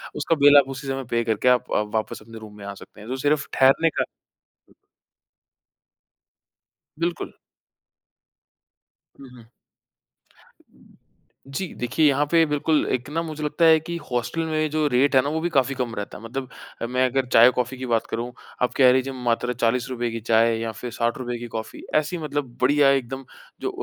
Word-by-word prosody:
उसका 160 +3 0
बिल 145 0 +7
आप 135 -1 +5
उसी 135 +1 -7
समय 135 0 -2
पे 115 0 +1
करके 110 +2 -1
आप 125 -1 +2
आप 105 0 -1
वापस 110 0 -2
अपने 115 +1 -11
रूम 105 -1 -12
में 100 - -10
आ 100 - -5
सकते 105 - -14
हैं। 110 - -10
तो 130 - -2
सिर्फ़ 145 +1 0
ठहरने 135 +5 +4
का - - -1 3.0
बिल्कुल। 170 0 -3 1.9
हुँ, 135 - -12
हुँ। 125 -2 -15 2.0
जी, 160 +8 -4
देखिए, 150 +6 +1
यहाँ 145 +1 +2
पे 165 -1 +5
बिल्कुल 150 +1 +1
एक 130 +2 -3
ना 165 +2 -1
मुझे 155 -2 -6
लगता 150 +3 +1
है 160 -1 +7
कि 170 +2 -6 0.2
हॉस्टल 125 +7 -1
में 155 -1 0
जो 155 -1 +1
रेट 135 +2 +2
है 130 - +7
ना, 140 - -2
वो 160 +2 -1
भी 175 - -1
काफ़ी 135 -3 +1
कम 125 -3 -3
रहता 105 - -6
है। 110 - -14
मतलब 130 +3 -5 0.3
अ, - - -1
मैं 125 +2 +1
अगर 135 +1 0
चाय-कॉफ़ी 125 +2 +4
की 130 - -5
बात 115 -2 0
करूँ, 120 +2 -3 0.3
आप 125 - +1
कह 130 -2 +6
लीजिए 130 +1 0
मात्र 125 -1 -1
₹40 120 +1 -1
की 115 - -4
चाय 115 0 +4
या 115 0 -3
फिर 120 +2 -7
₹60 120 +1 -2
की 120 - -6
कॉफ़ी। 110 0 -6
ऐसी 155 +3 +1
मतलब 145 -5 -4
बढ़िया 140 +2 +4
एकदम 135 0 -2 0.4
जो - - -1
130 Hz, 180 wpm, -23 LUFS, 120-145 Hz, 3.0 s, बिल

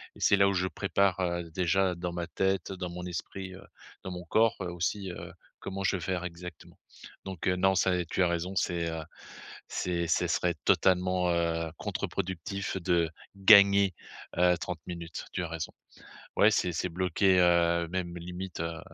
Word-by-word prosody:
et - - -15
c'est - - +5
là 100 0 +4
où - - 0
je 90 -1 +1
prépare, 95 -1 +1
heu, 85 -2 -2
déjà 90 +2 +1
dans 85 0 -4
ma 85 -1 -4
tête, 95 -1 -1
dans 90 -1 -5
mon 90 +1 -6
esprit, 95 +2 -6
heu, 95 - -12 0.4
dans 95 - -5
mon 90 0 -7
corps, 110 +6 +3
heu, 95 - -2
aussi, 90 +3 -2
heu, - - -8 0.3
comment 95 0 -5
je 95 - +2
vais - - -8
faire 90 0 -2
exactement. 90 -1 -9 0.5
Donc 95 -3 -5
heu, 90 - +3
non, 95 +1 +3
ça 95 0 +3
et 90 - -1
tu 85 - -2
as - - +4
raison, 85 +2 -2
c'est, 85 -3 0
heu, 80 0 -4 0.7
c'est 85 -1 -1
c'est - - +2
serait - - +1
totalement, 90 -1 +3
heu, 85 -1 0
contre-productif 95 +1 -3
de 85 -2 +2 0.3
gagner, 100 -1 +7 0.4
heu, 90 0 +4
30 85 0 -5
minutes, 85 -2 -6
tu - - -2
as - - -3
raison. 80 -1 -5 0.7
Ouais, 105 - +6
c'est 90 -4 +1
c'est 85 +2 -1
bloqué, 90 +2 +2
heu, 85 -1 +4
même 90 -1 -3
limite, 90 +2 -7
heu, 85 0 -3
90 Hz, 185 wpm, -29 LUFS, 85-95 Hz, 0.7 s, gagner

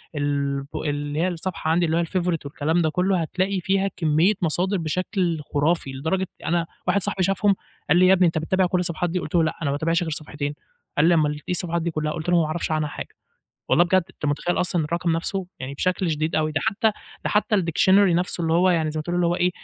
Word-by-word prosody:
البو 140 -1 -2
اللي 145 0 -2
هي 180 - +2
الصفحة 170 -2 -3
عَندي 170 +1 +3
اللي 160 0 +1
هو 170 - +2
الfavorite 175 -3 -1
والكلام 155 +4 0
ده 160 - +2
كلّه 180 +2 +1
هتلاقي 185 +4 -1
فيها 195 +2 +1
كميّة 160 +4 +3
مصادر 180 +4 0
بشكل 175 0 -1
خُرافي 145 -1 +1
لدرجة 160 +8 -1 0.2
أنا 170 +1 +1 0.2
واحد 200 - +2
صاحبي 185 +1 0
شافهم 195 +2 +2 0.3
قال - - +5
لي 180 - +5
إيه - - +5
"يا - - +7
ابني 185 -1 +4
أنت 165 -1 -1
بتتابع 185 +4 +1
كل 180 0 0
الصفحات 175 0 -1
دي؟" 180 +2 -1
قُلت 170 - -5
له 170 - +5
"لأ 155 - 0
أنا 155 - 0
ما - - +1
باتابعش 165 +4 0
غير 160 - -4
صفحتين." 150 -1 -4 0.4
قال 150 - +4
لي 175 - +5
"امال 155 -3 +3
إيه 150 - -9
الصفحات 170 -1 -1
دي 170 +1 -2
كّلها؟" 155 -1 -2
قُلت 160 +1 -4
له 175 -1 +4
"ما - - +1
اعرفش 160 +1 -3
عنها 155 -1 0
حاجة." - - -8 0.5
والله 175 - +5
بجد 185 +2 +3
أنت 155 - -6
متخيّل 150 +5 0
أصلًا 175 -2 0
الرقم 170 +2 -1
نَفْسه؟! 185 +3 -3
يعني 130 +2 -5
بشكل 185 +3 0
شديد 155 +1 -1
أوي 155 0 +1
ده 155 - 0
حتّى 220 0 +2 0.3
ده - - 0
حتّى 210 0 +2
الdictionary 190 +1 +3 0.2
نَفْسه 180 0 -1
اللي 160 -1 +1
هو 180 +2 +4
يعني 160 -3 +1
زي 155 - -3
ما - - -2
تقول 175 +3 -3
اللي 175 -1 +2
هو 170 +1 +1
إيه 180 0 +2
170 Hz, 240 wpm, -23 LUFS, 155-180 Hz, 0.5 s, يا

